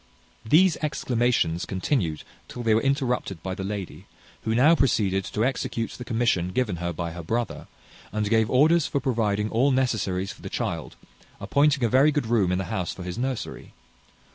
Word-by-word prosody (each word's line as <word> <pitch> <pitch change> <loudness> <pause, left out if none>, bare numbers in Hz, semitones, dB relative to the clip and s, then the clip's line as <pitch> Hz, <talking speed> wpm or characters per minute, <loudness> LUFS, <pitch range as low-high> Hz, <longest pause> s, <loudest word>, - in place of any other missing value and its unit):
These 165 +10 +4
exclamations 120 - 0
continued 95 - -1 0.2
till 120 - -7
they 110 -1 +3
were 110 - +3
interrupted 125 - -1
by 95 - -3
the 95 - -5
lady, 100 -2 -6 0.3
who 110 - -1
now 145 +7 +6
proceeded 100 - +2
to 110 - -1
execute 120 -3 -2
the 125 - -8
commission 115 -7 0
given 110 -7 0
her 85 +1 -2
by 85 0 -4
her 85 +1 -7
brother, 115 +8 -3 0.4
and 105 0 -1
gave 110 +1 +2
orders 155 +5 +4
for 140 - -1
providing 110 -5 0
all 125 +5 +3
necessaries 105 -8 0
for - - -14
the - - -7
child, - - -4 0.4
appointing 140 -2 +2
a - - +4
very 135 +6 +4
good 145 -3 -1
room 110 -6 +2
in 90 - +1
the 95 - -1
house 90 -2 -2
for 90 - -8
his 90 +5 -5
nursery. 130 -1 -4
115 Hz, 180 wpm, -25 LUFS, 95-130 Hz, 0.4 s, now